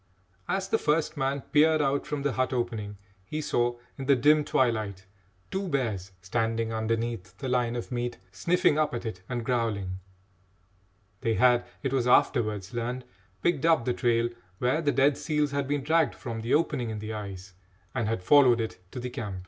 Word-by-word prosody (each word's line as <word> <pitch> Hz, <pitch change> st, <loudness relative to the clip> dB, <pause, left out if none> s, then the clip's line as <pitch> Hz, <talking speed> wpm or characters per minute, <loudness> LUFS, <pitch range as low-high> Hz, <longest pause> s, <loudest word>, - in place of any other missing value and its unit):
As 190 Hz, 0 st, -1 dB
the 225 Hz, -, +1 dB
first 150 Hz, +1 st, +1 dB
man 135 Hz, 0 st, -1 dB
peered 155 Hz, +3 st, +4 dB
out 140 Hz, -1 st, 0 dB
from 145 Hz, -2 st, -3 dB
the 145 Hz, -, +1 dB
hut 130 Hz, +1 st, 0 dB
opening, 110 Hz, -4 st, -3 dB, 0.3 s
he 150 Hz, +10 st, -4 dB
saw, 120 Hz, -5 st, 0 dB, 0.2 s
in 135 Hz, -, -5 dB
the 140 Hz, -, +6 dB
dim 150 Hz, +4 st, +4 dB
twilight, 110 Hz, -8 st, 0 dB, 0.5 s
two 190 Hz, 0 st, -2 dB
bears 110 Hz, -, -2 dB
standing 115 Hz, +2 st, -1 dB
underneath 110 Hz, -4 st, -2 dB
the 135 Hz, -, -5 dB
line 125 Hz, -2 st, +1 dB
of 120 Hz, -, -5 dB
meat, 120 Hz, -1 st, -2 dB
sniffing 155 Hz, -, +2 dB
up 150 Hz, -5 st, +1 dB
at 120 Hz, -, -5 dB
it 95 Hz, -5 st, -5 dB
and 120 Hz, -2 st, -3 dB
growling. 105 Hz, -7 st, -1 dB, 1.2 s
They 115 Hz, -3 st, 0 dB
had, 125 Hz, 0 st, +4 dB, 0.2 s
it 135 Hz, -1 st, -1 dB
was 125 Hz, -2 st, +1 dB
afterwards 110 Hz, -5 st, +2 dB
learned, 125 Hz, +2 st, -3 dB, 0.4 s
picked 165 Hz, -5 st, +1 dB
up 160 Hz, -8 st, +4 dB
the 125 Hz, -, +1 dB
trail 120 Hz, -1 st, +1 dB, 0.3 s
where 125 Hz, +8 st, +1 dB
the 145 Hz, -3 st, +2 dB
dead 140 Hz, +1 st, +3 dB
seals 150 Hz, -2 st, 0 dB
had 140 Hz, -1 st, -1 dB
been 145 Hz, -1 st, -1 dB
dragged 160 Hz, +1 st, +2 dB
from 115 Hz, -2 st, -5 dB
the 115 Hz, +5 st, +2 dB
opening 145 Hz, -7 st, 0 dB
in 110 Hz, -, -4 dB
the 110 Hz, +1 st, -5 dB
ice, 100 Hz, -3 st, -7 dB, 0.4 s
and 120 Hz, -4 st, -1 dB
had 110 Hz, -4 st, -2 dB
followed 130 Hz, -1 st, +6 dB
it 110 Hz, -4 st, -3 dB
to -, -, -4 dB
the 125 Hz, 0 st, -5 dB
camp. 100 Hz, -6 st, -5 dB
120 Hz, 185 wpm, -28 LUFS, 110-140 Hz, 1.2 s, the